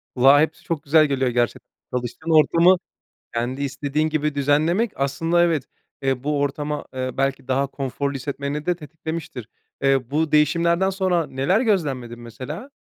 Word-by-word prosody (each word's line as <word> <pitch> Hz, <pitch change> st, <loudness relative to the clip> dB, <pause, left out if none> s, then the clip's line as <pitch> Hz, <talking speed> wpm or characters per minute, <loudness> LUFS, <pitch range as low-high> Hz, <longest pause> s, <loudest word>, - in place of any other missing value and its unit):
Kulağa 135 Hz, +3 st, +6 dB
hepsi 160 Hz, 0 st, -1 dB
çok 165 Hz, -3 st, -3 dB
güzel 155 Hz, +2 st, +5 dB
geliyor 135 Hz, -3 st, 0 dB
gerçekten. 120 Hz, 0 st, -2 dB, 0.2 s
Çalıştığın 125 Hz, +6 st, -4 dB
ortamı 170 Hz, +4 st, +5 dB, 0.6 s
kendi 125 Hz, +4 st, -2 dB
istediğin 145 Hz, +3 st, -1 dB
gibi 150 Hz, -1 st, -1 dB
düzenlemek 155 Hz, -, +2 dB
aslında 165 Hz, +5 st, +1 dB
evet, 165 Hz, -5 st, +1 dB, 0.4 s
eee, 135 Hz, -2 st, -1 dB
bu 145 Hz, 0 st, 0 dB
ortama, 145 Hz, +1 st, -2 dB
eee, 130 Hz, 0 st, -2 dB
belki 135 Hz, -1 st, -1 dB
daha 135 Hz, +1 st, +1 dB
konforlu 140 Hz, +1 st, -3 dB
hissetmeni 140 Hz, +2 st, -4 dB
de 180 Hz, -, +1 dB
tetiklemiştir. 160 Hz, -5 st, -7 dB, 0.4 s
Eee, 135 Hz, -3 st, +2 dB
bu 155 Hz, +1 st, 0 dB
değişimlerden 170 Hz, +4 st, +3 dB
sonra 185 Hz, -4 st, 0 dB
neler 140 Hz, -, +1 dB
gözlemledin 140 Hz, -, -1 dB
mesela? 130 Hz, -, -8 dB
145 Hz, 145 wpm, -22 LUFS, 135-160 Hz, 0.6 s, Kulağa